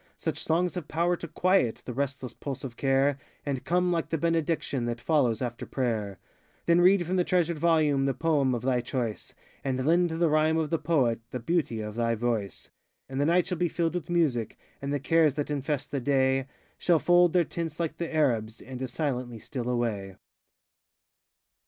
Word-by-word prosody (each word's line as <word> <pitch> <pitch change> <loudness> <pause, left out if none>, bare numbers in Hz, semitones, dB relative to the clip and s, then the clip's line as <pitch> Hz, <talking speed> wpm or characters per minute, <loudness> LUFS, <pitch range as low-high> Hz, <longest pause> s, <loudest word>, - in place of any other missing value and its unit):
Such - - -3
songs 175 +2 +1
have 175 -5 -5
power 170 +2 +1
to 170 - -7
quiet 170 -6 +1
The 125 - -5
restless 135 -2 -3
pulse 140 +2 -6
of 125 -4 -6
care, 135 +1 +2 0.3
And 140 -3 -2
come 180 +1 +1
like 165 -2 -1
the 165 - 0
benediction 165 -5 0
That 120 0 -3
follows 130 -5 +1
after 120 -1 -4
prayer. 110 -7 -2 0.5
Then 170 +1 +4
read 180 0 +5
from 185 +3 -1
the 180 - +3
treasured 170 -3 +1
volume 150 -4 +3
The 135 - 0
poem 145 -6 +2
of 120 - -5
thy 125 -1 +1
choice, 120 -3 -4 0.3
And 130 -1 -1
lend 175 +3 +3
to 160 - -3
the 170 0 +3
rhyme 155 +1 +3
of 160 -1 -1
the 165 - +1
poet 135 -8 +1
The 125 - -4
beauty 125 -4 -1
of 105 0 -5
thy 115 0 0
voice. 110 -5 -3 0.4
And 135 +1 -3
the 145 - +2
night 175 +2 +3
shall 180 -3 -3
be 175 - +2
filled 165 0 -1
with 175 -3 -4
music, 145 -11 0 0.2
And 140 0 -3
the 145 - 0
cares 155 0 +3
that 145 0 -2
infest 145 0 -2
the 140 - -2
day 135 0 +2 0.3
Shall 175 -2 +3
fold 175 +1 +4
their 180 -1 +4
tents 165 -1 -5
like 165 -2 -2
the 170 - -4
Arabs, 115 -8 +1
And 130 0 -8
as 130 -2 -4
silently 125 -5 -2
steal 120 +3 -5
away. 110 -6 -2
145 Hz, 195 wpm, -28 LUFS, 125-165 Hz, 0.5 s, read